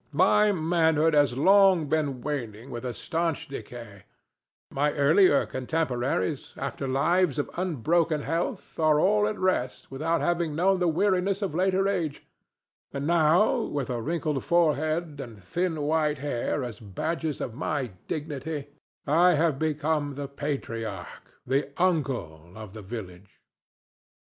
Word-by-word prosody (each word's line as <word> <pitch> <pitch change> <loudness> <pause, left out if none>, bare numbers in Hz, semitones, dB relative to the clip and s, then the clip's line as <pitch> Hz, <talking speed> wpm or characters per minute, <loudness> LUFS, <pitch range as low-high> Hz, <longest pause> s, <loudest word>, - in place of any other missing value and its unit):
My 210 +6 +4
manhood 160 -2 +2
has 145 -4 +3
long 190 +1 +5
been 140 -4 -1
waning 120 -4 -5
with 120 0 -6
a 125 - -2
stanch 165 +4 -2
decay; 115 -7 -9 0.7
my 145 +2 +1
earlier 145 +2 +4
contemporaries, 130 - -2
after 135 - -4
lives 150 +4 +2
of 145 - -2
unbroken 165 -2 0
health, 165 +3 -3
are 155 -2 +4
all 210 +4 +3
at 215 0 -3
rest 185 -12 -1
without 160 +5 0
having 170 -3 0
known 185 +3 +2
the 180 - +2
weariness 190 +3 +1
of 190 - -2
later 190 +3 +2
age; 170 -7 -2 0.7
and 140 0 -4
now 170 - +3
with 140 - -3
a 120 -2 -2
wrinkled 155 -1 -2
forehead 155 -2 +1
and 110 -7 -10
thin 165 - -2
white 150 0 +1
hair 140 0 -2
as 120 -2 -6
badges 155 - -3
of 120 - -4
my 140 -1 -2 0.2
dignity 145 -1 -4 0.4
I 170 +5 +4
have 155 -3 +1
become 150 -2 -1
the 140 0 -5
patriarch—the 135 0 -4
uncle—of 110 - -2
the 110 - -8
village. 95 -3 -9
150 Hz, 130 wpm, -27 LUFS, 130-170 Hz, 0.7 s, long